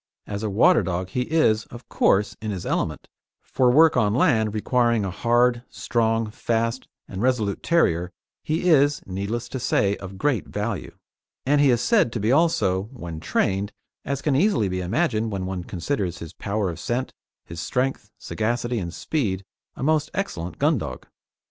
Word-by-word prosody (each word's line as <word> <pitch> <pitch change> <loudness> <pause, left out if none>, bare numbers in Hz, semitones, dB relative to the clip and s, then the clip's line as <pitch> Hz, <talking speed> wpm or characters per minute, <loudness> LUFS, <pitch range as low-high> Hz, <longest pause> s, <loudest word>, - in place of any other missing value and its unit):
As 100 0 -5
a 110 - -2
water 120 - +5
dog 90 0 -3
he 125 +5 -2
is, 115 -9 +3
of 120 +1 -12
course, 100 +1 +2
in 110 - -4
his 95 -4 -4
element; - - -2 0.4
for 125 -1 +2
work 155 +5 +6
on 105 0 +2
land 110 -5 +3
requiring 115 0 +1
a 95 - -3
hard, 120 +4 +2
strong, 115 -2 0
fast 115 +3 -1 0.2
and 95 0 -6
resolute 115 -5 0
terrier 90 - +2 0.3
he 160 +3 -1
is, 145 -3 +4
needless 100 +5 -3
to 130 - -4
say, 100 -4 +1
of 95 0 -9
great 130 +2 0
value; 105 -1 -4 0.5
and 145 +2 +3
he 145 - +5
is 120 -1 +3
said 120 -1 +3
to 115 - -2
be 110 +3 +1
also, 130 - +2
when 85 -11 -7
trained 100 +5 0 0.3
as 140 0 -3
can 145 -3 +2
easily 150 - +2
be 90 0 -2
imagined 110 - 0
when 95 -2 -3
one 95 -1 -4
considers 90 -1 -3
his 85 -2 -9
power 100 -2 -2
of 85 - -9
scent, 125 +6 -2 0.3
his 85 - -8
strength, 125 0 -2
sagacity, 120 +2 -2
and 85 -2 -5
speed 100 -11 -2 0.3
a - - -6
most 155 +1 +2
excellent 90 - -3
gun 150 -2 +2
dog. 65 -9 -6
115 Hz, 175 wpm, -24 LUFS, 95-130 Hz, 0.5 s, work